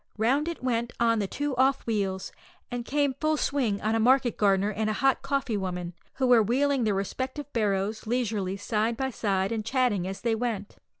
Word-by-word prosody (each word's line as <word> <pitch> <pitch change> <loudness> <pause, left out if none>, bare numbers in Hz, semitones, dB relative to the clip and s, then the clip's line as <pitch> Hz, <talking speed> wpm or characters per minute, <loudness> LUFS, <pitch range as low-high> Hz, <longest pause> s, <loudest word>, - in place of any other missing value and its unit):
Round 265 +8 +2
it 335 -6 -5
went 240 -1 -1
on 230 -1 +3
the 200 - -1
two 290 +5 -3
off 265 +1 +2
wheels, 195 -4 -2 0.4
and 245 -1 -3
came 285 +2 +1
full 310 +3 0
swing 250 -9 0
on 215 +1 +1
a 225 - +2
market 255 +1 +3
gardener 200 0 +2
and 215 +1 -1
a - - 0
hot 270 +3 +2
coffee 270 -6 -1
woman, 180 -2 -4 0.2
who 265 - 0
were 245 -2 +6
wheeling 260 +3 +1
their 210 -2 +1
respective 260 +8 -4
barrows 210 -1 -1
leisurely 215 -5 -1
side 220 +3 -1
by 265 0 -1
side, 195 -3 0
and 225 -2 -2
chatting 225 -6 +1
as 190 0 -6
they 230 -1 +1
went. 220 -3 -3
230 Hz, 195 wpm, -27 LUFS, 205-260 Hz, 0.4 s, were